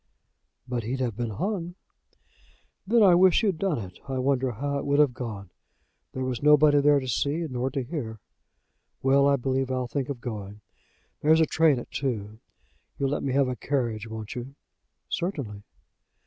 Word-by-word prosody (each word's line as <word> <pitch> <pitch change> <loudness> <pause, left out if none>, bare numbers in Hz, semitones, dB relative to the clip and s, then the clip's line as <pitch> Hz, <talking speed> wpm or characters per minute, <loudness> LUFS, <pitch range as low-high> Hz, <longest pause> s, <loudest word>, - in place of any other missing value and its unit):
"But 125 -1 -2
he'd 125 +4 -3
have 120 -5 -1
been 120 -1 -2
hung." 175 - -3 1.1
"Then 230 +1 +5
I 190 -3 +7
wish 185 +3 +5
he'd 195 -7 0
done 190 -7 0
it. 95 -5 -8
I 135 -1 -3
wonder 130 -1 +1
how 140 +5 -2
it - - -5
would 140 0 +2
have 145 -4 +4
gone. 110 -7 -6 0.6
There 130 - -3
was 125 -2 -3
nobody 150 0 +6
there 145 0 +5
to 130 - -6
see, 145 +7 0
nor 130 -1 -2
to 135 -1 -3
hear. 120 -6 -5 0.8
Well; 140 +1 +4
I 140 - +4
believe 135 0 -1
I'll 130 -1 -1
think 135 +2 -3
of 135 -4 -4
going. 105 -4 -7 0.6
There's 160 +2 +5
a 160 - +5
train 155 -2 +3
at 120 - -8
two. 110 -6 -3 0.6
You'll 135 -1 0
let 145 - -1
me 135 - -2
have 135 -1 +3
a 125 - -2
carriage; 120 -6 -2
won't 110 -1 -6
you?" 125 +3 -7 0.5
"Certainly." 135 - -3
135 Hz, 175 wpm, -26 LUFS, 120-145 Hz, 1.1 s, I